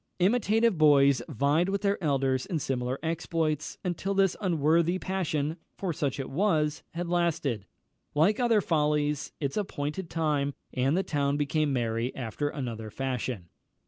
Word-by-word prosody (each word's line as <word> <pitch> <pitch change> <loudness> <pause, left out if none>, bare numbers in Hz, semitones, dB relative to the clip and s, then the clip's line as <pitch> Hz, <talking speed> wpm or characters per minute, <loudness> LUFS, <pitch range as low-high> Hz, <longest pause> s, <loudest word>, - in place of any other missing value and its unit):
Imitative 215 0 +2
boys 140 -3 +5
vied 145 - +2
with 200 +1 -1
their 200 -2 0
elders 135 -3 +1
in 170 - -1
similar 130 -2 -2
exploits, 160 -2 -1
until 190 +2 -2
this 195 -2 +3
unworthy 170 -1 +2
passion 165 -5 -2 0.2
(for 185 -4 -2
such 145 -4 -2
it 135 - -3
was) 155 -2 +1
had 175 +1 -2
lasted, 160 - 0 0.5
like 180 - +3
other 235 -4 +3
follies, 150 -3 0
its 140 +2 -2
appointed 170 -3 -3
time, 150 -4 0 0.2
and 135 +5 +1
the 190 - +1
town 145 -3 0
became 150 0 +1
merry 120 -1 -1
after 130 +4 -3
another 115 -7 -5
fashion. 125 -7 -3
150 Hz, 145 wpm, -28 LUFS, 140-175 Hz, 0.5 s, boys